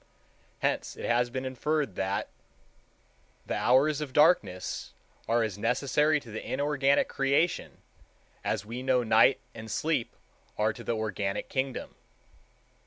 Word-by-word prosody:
Hence - - -1
it - - -5
has 120 +1 +2
been 130 +1 -4
inferred 140 -1 -1
that 95 +2 -2 1.2
"the - - -3
hours 140 +4 +3
of 140 -4 -5
darkness 110 - +2 0.3
are 115 0 +2
as 105 -3 -4
necessary 140 +6 +2
to 115 - -12
the 110 - -5
inorganic 140 0 +1
creation 140 +5 0 0.6
as 100 - -1
we 120 +4 -6
know 130 -1 +2
night 115 +4 +5
and 110 -1 -9
sleep 150 -1 -1 0.4
are 110 +1 +2
to - - -10
the 115 - -1
organic 100 -2 -2
kingdom." 130 -1 -3
125 Hz, 130 wpm, -29 LUFS, 110-140 Hz, 1.2 s, night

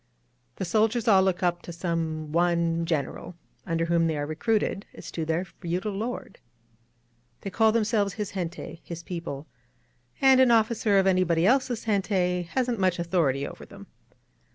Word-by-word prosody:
The 190 - -3
soldiers 220 +5 +1
all 195 -4 +6
look 190 0 0
up 175 -1 +1
to - - -8
some 165 -3 -3
one 170 0 +1
Greneral, 160 +2 -3 0.3
im 165 -2 0
der 165 - +1
whom 170 0 +2
they 160 -2 -1
are 145 - -2
recruited, 200 +6 -1
as - - -9
to 160 - -3
their 165 +3 -1
feudal 180 +3 -4
lord. 225 +5 -5 1.0
They 195 - -5
call 220 +3 +4
themselves 215 -3 +1
his 210 -2 -4
gente 170 -2 -5
— - - -27
^his 170 -1 -7
people; 165 -5 -5 0.7
and 265 -1 +6
an 260 - +5
officer 225 -2 +3
of 190 - +4
anybody 180 -3 +2
else's 245 0 +2
gente 185 -4 0
hasn't 245 -1 -1
much 185 -2 +2
authority 165 -6 0
over - - -10
them. - - -12
180 Hz, 165 wpm, -26 LUFS, 165-215 Hz, 1.0 s, all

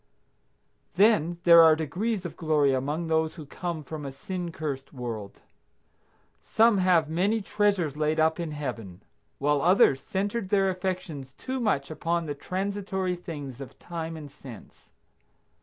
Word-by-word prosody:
Then 175 -5 +4
there 170 -1 +9
are 160 -1 +7
degrees 180 +6 -2
of 175 - -6
glory 150 -4 +2
among 145 +6 -1
those 160 -1 0
who 155 -4 -9
come 170 +1 -5
from 150 +1 -7
a 140 - -5
sin 175 +5 -5
cursed 140 -4 -5
world. 115 -6 -6 1.0
Some 225 -2 +4
have 180 -4 +3
many 190 +8 +1
treasures 200 -7 0
laid 155 +1 0
up 160 +2 +2
in 170 -2 -3
Heaven, 115 -11 -6 0.3
while 145 0 +1
others 170 -6 +4
centered 200 - -2
their 195 -1 +3
affections 180 -8 -4
too 260 - -5
much 160 - 0
upon 170 +1 -1
the 145 - -3
transitory 190 +3 -2
things 145 -7 -8
of 135 - -10
time 165 -1 -6
and 150 -3 -9
sense. 135 -5 -13
160 Hz, 145 wpm, -27 LUFS, 145-185 Hz, 1.0 s, there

